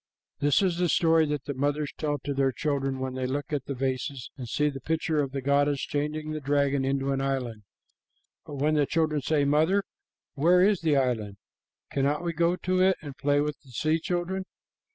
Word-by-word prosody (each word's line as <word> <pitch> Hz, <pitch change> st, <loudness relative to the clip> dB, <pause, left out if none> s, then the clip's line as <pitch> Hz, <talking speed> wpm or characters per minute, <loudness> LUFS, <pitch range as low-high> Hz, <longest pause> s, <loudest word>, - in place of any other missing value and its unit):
This 145 Hz, +5 st, +3 dB
is 180 Hz, -3 st, +1 dB
the 175 Hz, -1 st, +1 dB
story 165 Hz, -1 st, +4 dB
that 145 Hz, -2 st, -2 dB
the 140 Hz, -, -3 dB
mothers 145 Hz, +2 st, -1 dB
tell 145 Hz, -1 st, -1 dB
to 140 Hz, -, -2 dB
their 135 Hz, -1 st, +2 dB
children 135 Hz, -1 st, -1 dB
when 130 Hz, 0 st, -3 dB
they 130 Hz, 0 st, -2 dB
look 140 Hz, +2 st, -3 dB
at 140 Hz, -3 st, -1 dB
the 140 Hz, -, -4 dB
vases 130 Hz, 0 st, -3 dB
and 125 Hz, -4 st, -7 dB
see 150 Hz, +5 st, +1 dB
the 135 Hz, -2 st, -4 dB
picture 160 Hz, -1 st, 0 dB
of 135 Hz, -2 st, -3 dB
the 135 Hz, -1 st, -4 dB
goddess 140 Hz, +1 st, +2 dB
changing 150 Hz, +1 st, -2 dB
a -, -, -2 dB
dragon 140 Hz, -1 st, +1 dB
into 135 Hz, 0 st, 0 dB
an 135 Hz, 0 st, 0 dB
island. 130 Hz, -5 st, -2 dB, 0.8 s
But 145 Hz, -, -8 dB
when 150 Hz, +3 st, +1 dB
the 145 Hz, -2 st, +2 dB
children 155 Hz, -3 st, +1 dB
say, 145 Hz, +1 st, +1 dB
"Mother, 160 Hz, +8 st, +3 dB, 0.5 s
where 175 Hz, +5 st, +4 dB
is 205 Hz, -2 st, +2 dB
the 155 Hz, -4 st, +2 dB
island? 110 Hz, -7 st, -1 dB, 0.5 s
Cannot 140 Hz, +4 st, 0 dB
we 170 Hz, -1 st, -1 dB
go 170 Hz, +2 st, +2 dB
to 185 Hz, 0 st, 0 dB
it 190 Hz, 0 st, +4 dB
and 145 Hz, -3 st, -7 dB
play 145 Hz, 0 st, +2 dB
with 150 Hz, 0 st, -2 dB
the 135 Hz, -, -20 dB
sea 155 Hz, +6 st, 0 dB
children?" 180 Hz, +3 st, -2 dB
145 Hz, 205 wpm, -27 LUFS, 135-155 Hz, 0.8 s, story